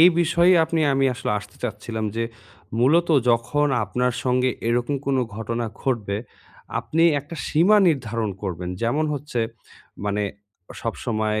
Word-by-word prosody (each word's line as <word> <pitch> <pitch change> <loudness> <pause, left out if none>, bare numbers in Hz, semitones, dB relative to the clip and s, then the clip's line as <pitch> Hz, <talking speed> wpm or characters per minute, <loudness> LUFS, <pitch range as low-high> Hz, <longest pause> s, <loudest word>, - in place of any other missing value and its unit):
এই 170 - +10
বিষয়ে 170 +2 +4
আপনি 165 0 -1
আমি 135 0 +2
আসলে - - -3
আসতে 105 0 -13
চাচ্ছিলাম 110 -1 -4
যে, 115 - 0 0.5
মূলত 155 +8 +4 0.2
যখন 125 +6 +2 0.2
আপনার 125 0 0
সঙ্গে 125 0 +2 0.2
এরকম 120 +4 +1
কোনো 135 -2 +2 0.2
ঘটনা 115 +1 -2 0.2
ঘটবে, 110 -7 -1 0.6
আপনি 165 +1 0 0.2
একটা 145 +4 -10
সীমা 180 +8 +4
নির্ধারণ 115 -8 -1
করবেন। 90 -2 -4
যেমন 140 +7 +1
হচ্ছে 140 -3 -3 0.6
মানে 105 0 0 0.6
সবসময় 110 -2 -1
125 Hz, 130 wpm, -23 LUFS, 110-145 Hz, 0.6 s, এই